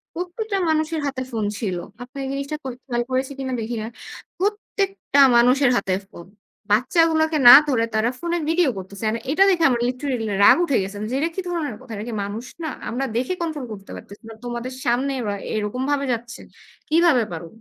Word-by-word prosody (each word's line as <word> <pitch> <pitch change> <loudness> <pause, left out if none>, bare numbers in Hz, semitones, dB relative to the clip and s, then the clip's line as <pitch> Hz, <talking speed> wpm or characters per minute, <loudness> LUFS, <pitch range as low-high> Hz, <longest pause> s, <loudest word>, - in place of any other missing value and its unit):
প্রত্যেকটা 390 +4 -3
মানুষের 315 0 0
হাতে 270 -2 -3
ফোন 220 -3 -2
ছিল। 185 -6 -2 0.3
আপনি 255 +3 -13
এই 265 - -4
জিনিসটা 280 +2 -3
খেয়াল 250 -1 -3
করেছি 260 +2 0
কিনা 260 -1 -3
দেখি 230 +2 -4
না। 220 - -4 0.5
প্রত্যেকটা 395 -5 -1 0.2
মানুষের 250 +3 +4
হাতে 195 -1 -1 0.2
ফোন। 170 -2 -12 0.4
বাচ্চাগুলোকে 315 +7 +3
না - - +13
ধরে 230 -5 +2
তারা 220 +2 +2
ফোনে 345 0 -1
ভিডিও 330 -3 +3
করতেছে 190 +2 -8
এন্ড 225 - -1
এটা 375 +6 +5
দেখে 345 -3 +2
আমার 240 -2 0
লিটারেলি 250 -2 -2 0.2
রাগ - - +9
উঠে 280 -7 +1
গেছে 195 +2 -7 0.2
যে, - - -1
এটা 325 - 0
কি 380 - -2
ধরনের 320 -10 -3
কথা। 255 -2 -14
এরা 210 +2 -5
কি 230 - -5
মানুষ 210 +4 -5 0.2
না, - - -2 0.2
আমরা 265 +3 -2
দেখে 255 +9 0
কন্ট্রোল 310 -5 -3
করতে 195 -1 -11
পারতেছি 200 +4 -12
না, 225 - -8
তোমাদের 240 +1 -5
সামনে 255 +3 +1 0.4
এরকম 215 +4 -2
ভাবে 280 -1 0
যাচ্ছে। 235 +1 -5 0.5
কিভাবে 315 -6 +4
পারো? 165 0 -6
260 Hz, 185 wpm, -22 LUFS, 230-315 Hz, 0.5 s, না